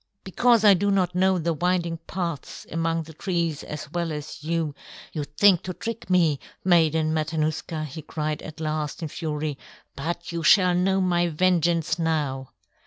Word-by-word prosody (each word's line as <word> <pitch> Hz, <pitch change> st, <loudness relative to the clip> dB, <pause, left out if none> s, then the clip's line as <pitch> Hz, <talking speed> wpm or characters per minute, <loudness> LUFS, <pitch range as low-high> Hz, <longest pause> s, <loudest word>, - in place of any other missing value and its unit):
"Because 230 Hz, +4 st, +3 dB
I 205 Hz, -, +9 dB
do 200 Hz, +2 st, +1 dB
not 185 Hz, -3 st, +2 dB
know 190 Hz, +1 st, +3 dB
the 170 Hz, 0 st, 0 dB
winding 170 Hz, +1 st, 0 dB
paths 170 Hz, -5 st, -4 dB
among 165 Hz, 0 st, 0 dB
the 160 Hz, +1 st, -12 dB
trees 170 Hz, -3 st, -2 dB
as 150 Hz, -1 st, -7 dB
well 170 Hz, -1 st, -2 dB
as 150 Hz, -1 st, -7 dB
you, 160 Hz, -2 st, -1 dB, 0.4 s
you 150 Hz, -, -2 dB
think 175 Hz, +5 st, +4 dB
to 185 Hz, -1 st, -6 dB
trick 230 Hz, -2 st, -6 dB
me, 165 Hz, -6 st, +3 dB, 0.3 s
Maiden 160 Hz, -3 st, +3 dB
Matanuska," 155 Hz, 0 st, -1 dB
he 155 Hz, +2 st, -7 dB
cried 155 Hz, 0 st, -3 dB
at 155 Hz, -, -9 dB
last, 155 Hz, 0 st, -3 dB
in 160 Hz, -, -3 dB
fury, 150 Hz, -3 st, -3 dB, 0.4 s
"but 170 Hz, +5 st, -4 dB
you 170 Hz, 0 st, -3 dB
shall 180 Hz, +2 st, +5 dB
know 190 Hz, +2 st, +2 dB
my 175 Hz, -1 st, +2 dB
vengeance 170 Hz, -1 st, +1 dB
now." 145 Hz, -5 st, -1 dB
165 Hz, 165 wpm, -25 LUFS, 155-180 Hz, 0.4 s, I